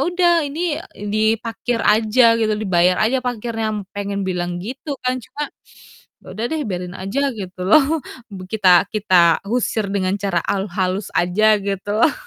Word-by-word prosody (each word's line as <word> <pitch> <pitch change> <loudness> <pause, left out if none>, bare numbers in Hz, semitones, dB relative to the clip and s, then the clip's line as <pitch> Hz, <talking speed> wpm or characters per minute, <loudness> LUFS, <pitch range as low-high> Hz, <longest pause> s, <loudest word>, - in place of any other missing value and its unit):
udah 350 0 +3
ini, 310 +2 -2 0.2
eee, 205 - -8
diparkir 225 +2 0
aja 230 +2 +4
gitu, 220 -1 +1
dibayar 185 -4 +2
aja 255 +4 +1
parkirnya 225 -3 -3
pengen 200 0 -3
bilang 175 -1 -3
gitu 265 +6 -5
kan. 255 0 0
Cuma 290 +4 -6 0.7
ya - - -21
udah 225 - -3
deh 315 -2 -1
biarin 180 -1 -5
aja 195 +9 -2 0.2
gitu 185 -3 -8
loh. 305 +7 +4 0.3
B 185 -2 -8
kita 190 -4 +4
kita 180 -6 +4
usir 225 -2 0
dengan 190 -1 0
cara 195 -4 0
al 195 0 -1
halus 185 +2 -2
aja 210 +5 +3
gitu 200 0 -4
loh. 300 - +4
215 Hz, 155 wpm, -20 LUFS, 190-240 Hz, 0.7 s, aja